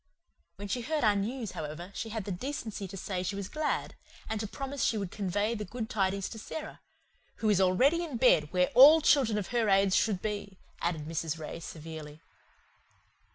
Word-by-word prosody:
When 205 Hz, -, -7 dB
she 245 Hz, +5 st, -2 dB
heard 305 Hz, +4 st, -1 dB
our 210 Hz, -2 st, +4 dB
news, 225 Hz, +2 st, -2 dB
however, 155 Hz, +5 st, -6 dB
she 225 Hz, -, -5 dB
had 220 Hz, -1 st, -4 dB
the 200 Hz, -, -4 dB
decency 220 Hz, -1 st, -4 dB
to 195 Hz, +1 st, -8 dB
say 185 Hz, -1 st, -3 dB
she 185 Hz, +2 st, -3 dB
was 200 Hz, -1 st, -4 dB
glad, 305 Hz, +6 st, -2 dB, 0.3 s
and 220 Hz, -1 st, -2 dB
to 215 Hz, -, -3 dB
promise 275 Hz, +4 st, -4 dB
she 225 Hz, -, +2 dB
would 195 Hz, -4 st, -3 dB
convey 205 Hz, +2 st, -1 dB
the 210 Hz, -2 st, -4 dB
good 220 Hz, +3 st, -6 dB
tidings 195 Hz, -1 st, 0 dB
to 225 Hz, -, -8 dB
Sara 310 Hz, +7 st, -7 dB, 0.6 s
"who 220 Hz, -, 0 dB
is 195 Hz, -2 st, +3 dB
already 260 Hz, -, +3 dB
in 300 Hz, -8 st, -4 dB
bed, 155 Hz, -, +4 dB
where 180 Hz, -1 st, +2 dB
all 290 Hz, +6 st, +9 dB
children 260 Hz, -8 st, +4 dB
of 205 Hz, -, -3 dB
her 235 Hz, -3 st, +1 dB
age 195 Hz, -1 st, +4 dB
should 205 Hz, -2 st, +2 dB
be," 205 Hz, -1 st, -4 dB, 0.2 s
added 165 Hz, -3 st, -1 dB
Mrs. 160 Hz, 0 st, -3 dB
Ray 155 Hz, +1 st, -6 dB
severely. 155 Hz, -2 st, -8 dB
205 Hz, 195 wpm, -30 LUFS, 185-235 Hz, 0.6 s, all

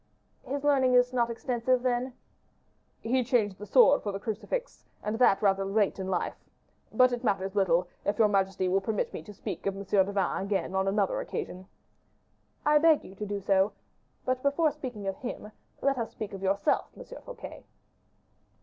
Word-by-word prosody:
"His 280 Hz, +1 st, -4 dB
learning 265 Hz, -3 st, +3 dB
is 250 Hz, 0 st, +4 dB
not 240 Hz, -2 st, +1 dB
extensive, 245 Hz, +1 st, 0 dB
then?" 250 Hz, 0 st, 0 dB, 0.9 s
"He 250 Hz, +3 st, +1 dB
changed 220 Hz, -6 st, +1 dB
the 210 Hz, -, -8 dB
sword 455 Hz, -, +6 dB
for 205 Hz, -, -3 dB
the 195 Hz, -, -5 dB
crucifix, 230 Hz, -, -4 dB, 0.2 s
and 210 Hz, +2 st, -2 dB
that 215 Hz, -5 st, +4 dB
rather 195 Hz, -1 st, +3 dB
late 200 Hz, 0 st, +1 dB
in 190 Hz, -, -3 dB
life. 190 Hz, -, -1 dB, 0.6 s
But 255 Hz, -1 st, +5 dB
it 245 Hz, 0 st, -3 dB
matters 195 Hz, -4 st, 0 dB
little, 180 Hz, -3 st, +2 dB, 0.2 s
if 205 Hz, 0 st, -1 dB
your 220 Hz, -, +5 dB
majesty 195 Hz, -2 st, +1 dB
will 190 Hz, +2 st, +2 dB
permit 210 Hz, +1 st, -2 dB
me -, -, -5 dB
to 185 Hz, -, -11 dB
speak 200 Hz, -, -6 dB
of 195 Hz, -, -1 dB
M. 200 Hz, -, -5 dB
de 195 Hz, 0 st, +2 dB
Vannes 195 Hz, -1 st, 0 dB
again 195 Hz, -2 st, -1 dB
on 190 Hz, 0 st, +1 dB
another 195 Hz, 0 st, +1 dB
occasion 185 Hz, +1 st, -6 dB, 0.5 s
" -, -, -41 dB
"I 300 Hz, 0 st, +5 dB
beg 320 Hz, -1 st, +4 dB
you -, -, -11 dB
to 210 Hz, +2 st, -6 dB
do 205 Hz, 0 st, -3 dB
so. 195 Hz, +1 st, +2 dB, 0.5 s
But 255 Hz, 0 st, 0 dB
before 290 Hz, +3 st, +2 dB
speaking 255 Hz, -8 st, -7 dB
of 195 Hz, 0 st, -2 dB
him, 230 Hz, -4 st, -6 dB, 0.3 s
let 275 Hz, -2 st, +2 dB
us 230 Hz, -, -2 dB
speak 210 Hz, -2 st, -6 dB
of 195 Hz, -, -7 dB
yourself, 195 Hz, +7 st, +1 dB
M. -, -, -9 dB, 0.2 s
Fouquet." -, -, -10 dB
210 Hz, 185 wpm, -29 LUFS, 195-255 Hz, 0.9 s, sword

